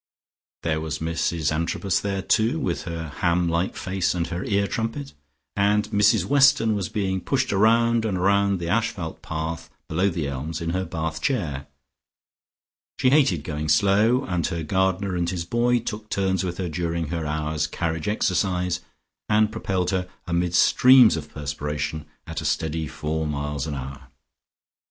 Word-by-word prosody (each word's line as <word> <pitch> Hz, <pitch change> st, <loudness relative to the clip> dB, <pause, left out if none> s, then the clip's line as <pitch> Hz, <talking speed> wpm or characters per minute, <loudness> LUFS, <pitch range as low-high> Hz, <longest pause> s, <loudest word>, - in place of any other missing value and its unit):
There 80 Hz, -1 st, 0 dB
was 80 Hz, -1 st, -3 dB
Mrs 80 Hz, -1 st, -1 dB
Antrobus 85 Hz, +3 st, 0 dB
there, 100 Hz, -1 st, -2 dB
too, 115 Hz, +10 st, +2 dB
with 135 Hz, -, -2 dB
her 85 Hz, -2 st, -5 dB
ham 85 Hz, 0 st, +2 dB
like 85 Hz, +2 st, 0 dB
face 95 Hz, -1 st, -1 dB
and 85 Hz, -1 st, 0 dB
her 90 Hz, +1 st, -3 dB
ear 100 Hz, -1 st, +1 dB
trumpet, 115 Hz, +7 st, -3 dB, 0.4 s
and 105 Hz, +1 st, +2 dB
Mrs 105 Hz, -2 st, +4 dB
Weston 135 Hz, -4 st, +4 dB
was 100 Hz, -5 st, -2 dB
being 95 Hz, -2 st, -1 dB
pushed 135 Hz, -2 st, 0 dB
round 115 Hz, +3 st, +3 dB
and 100 Hz, -5 st, -1 dB
round 100 Hz, +1 st, +3 dB
the 85 Hz, -1 st, -5 dB
asphalt 100 Hz, -4 st, -2 dB
path 80 Hz, +1 st, -4 dB, 0.2 s
below 90 Hz, +5 st, +1 dB
the 80 Hz, -5 st, -3 dB
elms 70 Hz, +4 st, -4 dB
in 85 Hz, 0 st, -2 dB
her 95 Hz, +1 st, -1 dB
bath 80 Hz, -2 st, -4 dB
chair. 80 Hz, -, -1 dB, 1.3 s
She 130 Hz, -, +3 dB
hated 135 Hz, -, +3 dB
going 75 Hz, 0 st, -4 dB
slow, 105 Hz, -, +3 dB
and 90 Hz, -2 st, -1 dB
her 85 Hz, -3 st, -3 dB
gardener 95 Hz, +3 st, 0 dB
and 85 Hz, -1 st, 0 dB
his 85 Hz, -2 st, -3 dB
boy 120 Hz, +5 st, +2 dB
took 110 Hz, -2 st, -5 dB
turns 95 Hz, -2 st, 0 dB
with 90 Hz, -1 st, -3 dB
her 95 Hz, -, -2 dB
during 85 Hz, -1 st, -2 dB
her 80 Hz, -2 st, -3 dB
hour's 75 Hz, 0 st, -1 dB
carriage 80 Hz, +1 st, -3 dB
exercise, 90 Hz, -3 st, 0 dB, 0.5 s
and 110 Hz, 0 st, +3 dB
propelled 95 Hz, -5 st, -1 dB
her, 90 Hz, -1 st, -1 dB, 0.2 s
amid 85 Hz, 0 st, 0 dB
streams 125 Hz, -, +6 dB
of 75 Hz, -2 st, -6 dB
perspiration, 75 Hz, +1 st, -4 dB, 0.2 s
at -, -, -5 dB
a -, -, -7 dB
steady 80 Hz, 0 st, -1 dB
four 80 Hz, +3 st, -3 dB
miles 75 Hz, 0 st, -3 dB
an 75 Hz, -, -3 dB
hour. 65 Hz, 0 st, -7 dB
90 Hz, 160 wpm, -24 LUFS, 80-105 Hz, 1.3 s, streams